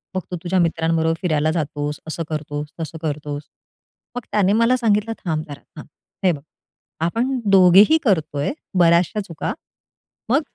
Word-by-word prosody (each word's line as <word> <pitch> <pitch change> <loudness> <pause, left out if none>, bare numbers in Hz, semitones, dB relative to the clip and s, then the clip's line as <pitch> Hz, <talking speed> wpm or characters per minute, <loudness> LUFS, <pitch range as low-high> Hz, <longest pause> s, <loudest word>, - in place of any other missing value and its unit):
मग 185 - 0
तू - - -2
तुझ्या 185 +1 +1
मित्रांबरोबर 165 -1 +1
फिरायला 155 -3 +1
जातोस, 150 -2 -3
असं 165 +1 -3
करतोस, 150 -1 -4
तसं 160 0 -5
करतोस. 145 -2 -4 0.7
मग 245 - -3
त्याने 205 -1 +3
मला 230 +3 +4
सांगितलं 225 -2 +1
थांब 155 -3 -1
जरा 145 -1 -8 0.2
थांब. 150 - -10 0.4
हे 185 - +5
बघ, 150 -4 -5 0.6
आपण 245 +9 0
दोघेही 195 - +7
करतोय 160 - 0 0.3
बऱ्याचश्या 170 +4 +3
चुका. 165 -5 -4 0.8
मग 270 +6 +3
170 Hz, 140 wpm, -21 LUFS, 155-205 Hz, 0.8 s, दोघेही